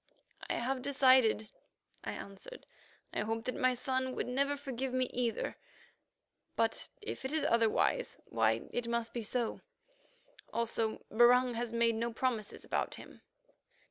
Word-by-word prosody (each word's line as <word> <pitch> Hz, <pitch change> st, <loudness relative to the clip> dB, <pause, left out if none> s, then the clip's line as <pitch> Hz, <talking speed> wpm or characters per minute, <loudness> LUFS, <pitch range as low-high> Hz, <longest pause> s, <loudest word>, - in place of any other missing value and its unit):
"I -, -, +1 dB
have 255 Hz, +2 st, -1 dB
decided," 255 Hz, -5 st, +4 dB, 0.5 s
I -, -, -3 dB
answered. 200 Hz, -, -9 dB, 0.5 s
"I -, -, -1 dB
hope 225 Hz, +1 st, -1 dB
that 255 Hz, -, -2 dB
my 255 Hz, 0 st, +2 dB
son 260 Hz, +1 st, -1 dB
would -, -, -1 dB
never 280 Hz, +3 st, 0 dB
forgive 265 Hz, -2 st, -3 dB
me 255 Hz, 0 st, +3 dB
either; 240 Hz, -3 st, -1 dB, 1.0 s
but 225 Hz, 0 st, +1 dB, 0.2 s
if 420 Hz, -, -5 dB
it 265 Hz, -, -2 dB
is 315 Hz, 0 st, +1 dB
otherwise, 230 Hz, -, +2 dB
why, -, -, +2 dB
so -, -, -13 dB
it 245 Hz, -1 st, -1 dB
must 235 Hz, -1 st, -1 dB
be. 235 Hz, -, -3 dB, 1.3 s
Also 230 Hz, -1 st, -1 dB
Barung 245 Hz, +2 st, +6 dB
has 235 Hz, 0 st, -2 dB
made 230 Hz, 0 st, +3 dB
no 230 Hz, +1 st, -1 dB
promises 230 Hz, -3 st, -2 dB
about -, -, -1 dB
him." -, -, -12 dB
245 Hz, 140 wpm, -33 LUFS, 230-260 Hz, 1.3 s, Barung